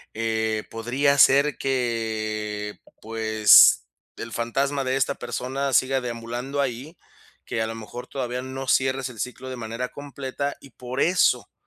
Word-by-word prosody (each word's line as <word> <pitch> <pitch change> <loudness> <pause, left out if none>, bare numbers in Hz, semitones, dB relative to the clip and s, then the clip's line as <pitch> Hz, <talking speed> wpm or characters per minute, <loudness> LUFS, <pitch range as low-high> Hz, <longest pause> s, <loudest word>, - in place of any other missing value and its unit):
eh, 110 -1 -1
podría 130 +5 +1
ser 140 +2 +5
que, 110 -4 -2 0.2
pues, 110 - +6 0.3
el 115 - -7
fantasma 135 +4 -1
de 130 0 0
esta 135 +1 +1
persona 135 +2 -3
siga 130 +1 +3
deambulando 120 +3 -5
ahí. 135 +5 -4 0.5
Que 110 - -2
a 110 - 0
lo 115 - -5
mejor 115 +2 -8
todavía 125 -2 -4
no 130 +1 -6
cierres 130 0 +1
el 115 - -12
ciclo 125 +2 -5
de - - -5
manera 115 +2 -4
completa. 140 0 -5
Y 140 - -16
por 125 +2 -6
eso 180 +2 +2
125 Hz, 145 wpm, -24 LUFS, 115-135 Hz, 0.5 s, pues